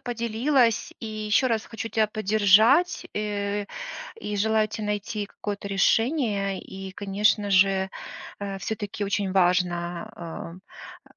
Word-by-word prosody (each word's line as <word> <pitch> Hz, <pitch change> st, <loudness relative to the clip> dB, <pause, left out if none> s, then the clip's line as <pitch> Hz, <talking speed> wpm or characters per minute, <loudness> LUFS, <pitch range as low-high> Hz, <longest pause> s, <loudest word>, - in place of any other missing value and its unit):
поделилась, 235 Hz, +1 st, +1 dB
и 225 Hz, -, -6 dB
еще 215 Hz, +3 st, +1 dB
раз 225 Hz, -3 st, 0 dB
хочу 225 Hz, 0 st, -5 dB
тя 220 Hz, -1 st, +2 dB
поддержать, 215 Hz, -, +4 dB
э, 205 Hz, -1 st, -2 dB, 0.5 s
и 210 Hz, -, -3 dB
желаю 220 Hz, +1 st, +2 dB
те 215 Hz, 0 st, -6 dB
найти 210 Hz, 0 st, -2 dB
какое-то 205 Hz, 0 st, -6 dB
решение. 200 Hz, -1 st, +1 dB
И, 190 Hz, 0 st, -8 dB
конечно 205 Hz, +1 st, +1 dB
же, 190 Hz, 0 st, +4 dB, 0.5 s
э, 200 Hz, -1 st, -4 dB
всё-таки 205 Hz, 0 st, -4 dB
очень 200 Hz, -1 st, -1 dB
важно, 175 Hz, 0 st, -1 dB, 0.6 s
э, -, -, -64 dB
205 Hz, 120 wpm, -25 LUFS, 195-220 Hz, 0.6 s, поддержать